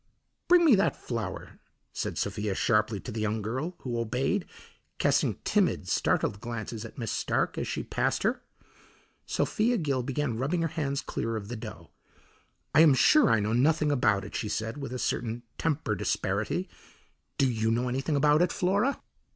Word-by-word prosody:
"Bring 350 -1 +6
me 300 - +7
that 190 -8 +3
flour," 110 -6 -5 0.3
said - - -3
Sophia 105 -2 -2
sharply 105 -1 +1
to 125 - -7
the 110 0 -4
young 110 0 -1
girl, 130 - -3
who 120 -2 -3
obeyed, 125 - -1 0.5
casting - - +2
timid, - - +1
startled 100 - 0
glances 115 -1 -5
at 115 - -10
Miss 115 -4 -3
Stark - - 0
as - - -3
she - - -3
passed - - -1
her. - - 0 0.9
Sophia 235 +3 +1
Gill 140 -7 0
began 130 -2 -2
rubbing 165 +6 0
her 165 - 0
hands 145 -3 -2
clear 115 0 -3
of 105 -2 -5
the 120 - -4
dough. 105 -8 -9 0.8
"I 155 - +5
am 155 -4 +7
sure 305 - +5
I 110 - +4
know 105 +2 -1
nothing 150 +4 +3
about 100 -8 +2
it," - - -10
she 105 - -3
said 110 +5 -3
with 140 -3 -5
a 125 - -3
certain 120 -1 -2 0.2
tempered 145 - -1
asperity. - - -1 0.7
"Do 135 - +3
you 110 -2 0
know 120 +2 +1
anything 135 +4 -1
about 150 +2 +4
it, 175 - +2
Flora?" 200 +9 +1
125 Hz, 175 wpm, -28 LUFS, 110-155 Hz, 0.9 s, me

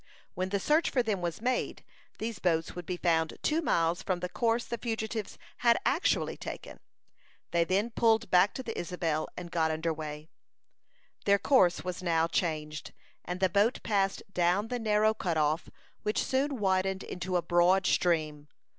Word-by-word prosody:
When 185 +1 -2
the 200 +1 0
search 305 - +2
for 250 - +1
them 210 -5 -1
was 175 +4 -4
made, 250 0 -1 0.3
these 220 -2 -4
boats 165 -3 0
would 175 -2 -7
be 180 - -2
found 160 -2 +1
two 315 +2 +2
miles 170 - +1
from 185 -2 -1
the 180 0 -4
course 230 +2 0
the 235 - -4
fugitives 220 -2 -3 0.2
had 235 -1 +4
actually 315 +7 +1
taken. - - -8 0.7
They 170 -1 +2
then 200 +6 0
pulled 225 -4 +2
back 180 +3 +4
to 260 - -4
the 225 - -5
Isabel, 165 -3 -2
and 175 -1 -7
got 160 -2 +1
under 160 +1 -1
way 155 -1 -5
again. 155 - -23 1.0
Their 200 0 +5
course 190 -7 +3
was 180 0 -4
now 165 -2 +2
changed, 155 -3 -2 0.3
and 180 0 -4
the 190 - +4
boat 205 +6 +1
passed 195 -3 0
down 180 +5 +1
the 245 -1 -2
narrow 215 -1 +3
cut 175 -6 -2
off, 155 +2 +1 0.3
which 210 - 0
soon 270 +1 0
widened 190 -1 0
into 180 0 -4
a 175 - -1
broad 175 +2 +3
stream. 155 -5 +1
185 Hz, 175 wpm, -30 LUFS, 170-220 Hz, 1.0 s, Their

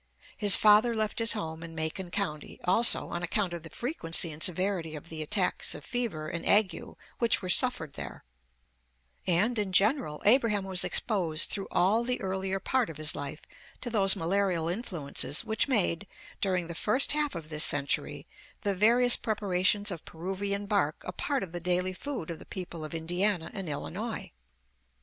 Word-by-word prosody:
His 205 -2 +7
father 215 +3 +5
left 215 0 -2
his 230 0 +2
home 160 -6 -6
in 165 -1 -9
Macon 160 +3 -4
County, 175 -6 -4
also, 210 +7 +5
on 175 - -4
account 180 +1 -1
of 170 - -6
the 160 - -11
frequency 170 - +2
and 150 +1 -10
severity 180 -3 +1
of 150 +2 -11
the 160 -1 -6
attacks 185 +4 0
of - - -11
fever 230 -11 -3
and 170 +2 -5
ague 205 -2 +3 0.4
which 235 -4 +1
were 180 - 0
suffered 175 - +2
there; - - -8 1.0
and, 205 +7 +2
in 200 -2 -2
general, 205 - +2
Abraham 210 -3 +4
was 190 -1 +3
exposed 175 -7 +1
through 195 -2 -4
all 200 +6 +2
the 250 +1 -2
earlier 190 0 -3
part 250 +3 0
of 160 - -9
his 155 0 -1
life 145 +2 -7 0.4
to 240 - -4
those 195 -4 +5
malarial 175 -1 0
influences 170 - 0
which 220 +4 0
made, 205 -7 +1 0.3
during 185 -3 0
the 170 - -7
first 215 +10 +2
half 300 -4 -1
of 160 -2 -8
this 155 -1 +3
century, 145 -1 0 0.4
the 200 -2 -1
various 240 +5 +4
preparations 205 -1 -1
of 170 -4 -7
Peruvian 195 +4 -4
bark 195 -7 -1
a - - -4
part 275 +8 -2
of 180 - -8
the 175 - -5
daily 180 +1 -1
food 225 - -6
of 165 - -8
the - - -13
people 175 -4 -7
of 155 +2 -7
Indiana 175 +2 -1
and 190 -5 -5
Illinois. 190 +5 -5
190 Hz, 175 wpm, -28 LUFS, 165-215 Hz, 1.0 s, His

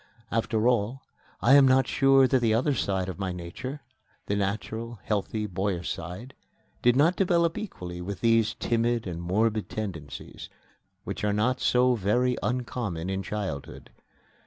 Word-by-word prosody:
After 115 0 +1
all, 120 +2 +1 0.4
I 130 - +6
am 140 -1 +8
not 130 0 +4
sure 135 -1 +4
that 130 0 +3
the 110 -2 +3
other 135 +5 +2
side 95 -7 -1
of 95 0 -6
my 95 -2 -2
nature 90 - -6 0.4
the 100 - -1
natural, 110 +3 -3
healthy, 105 +1 -1
boyish 95 -2 -2
side 90 +10 -8 0.5
did 120 0 +4
not 160 +7 +4
develop 170 -3 +2
equally 90 - -6
with 95 +1 -6
these 115 -1 +3
timid 120 0 0
and 85 -3 -5
morbid 105 +5 0
tendencies, 80 -10 -6 0.5
which - - -5
are 105 -1 +1
not 110 +5 +1
so 125 0 +3
very 120 +4 +1
uncommon 115 -8 -2
in 95 0 -2
childhood. 95 -9 -5
110 Hz, 150 wpm, -27 LUFS, 95-125 Hz, 0.5 s, am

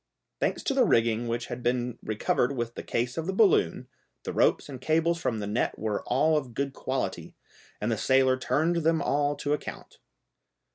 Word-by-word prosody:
Thanks - - -1
to 275 - 0
the 265 -1 +4
rigging 115 - +2
which 120 +1 -2
had 125 0 -6
been 120 0 -1
recovered 120 +5 0
with 120 0 -2
the - - -6
case 125 +4 -2
of 165 - -4
the 190 - -1
balloon, 190 - +3 0.4
the - - -4
ropes - - +2
and 130 -3 -8
cables 165 +3 +1
from 115 - -1
the 105 - -3
net 105 +4 -1
were 105 -1 -2
all 150 +6 +3
of 130 -6 -5
good 140 -1 -2
quality, - - -3 0.4
and 105 +3 -1
the 115 - 0
sailor 130 0 +4
turned 160 +6 0
them 165 0 +2
all 145 0 +1
to 145 0 -1
account. 150 - -6
130 Hz, 190 wpm, -27 LUFS, 120-155 Hz, 0.4 s, the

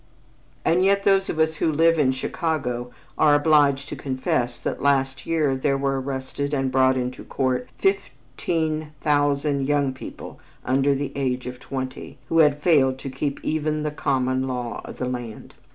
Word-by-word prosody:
And 175 +3 +3
yet 200 +1 +3
those 195 -1 +3
of - - -3
us 160 0 +1
who 160 - +1
live 165 +2 +3
in 135 -3 +4
Chicago 130 -3 -2 0.3
are 150 -1 +6
obliged 145 -2 +3
to - - -5
confess 130 -2 -2
that - - -4
last 135 -1 +1
year 155 -5 +1
there 135 +1 0
were 135 -1 0
arrested 135 +2 -3
and 135 -1 0
brought 130 0 +3
into 125 0 -3
court 130 -2 -1
fifteen 155 -1 -2
thousand 145 -1 +1
young 140 -2 +1
people 130 - -9 0.3
under 135 +2 +2
the 135 0 -3
age 130 -2 -1
of 125 0 -6
twenty, 130 -1 -6
who 165 - +3
had 150 -2 +4
failed 135 -6 +4
to 135 0 -7
keep 140 +1 -3
even 155 -1 -1
the 150 - -1
common 130 -2 0
law 125 -3 -4
of - - -9
the 125 - -2
land. 120 -3 -6
140 Hz, 170 wpm, -23 LUFS, 130-150 Hz, 0.3 s, are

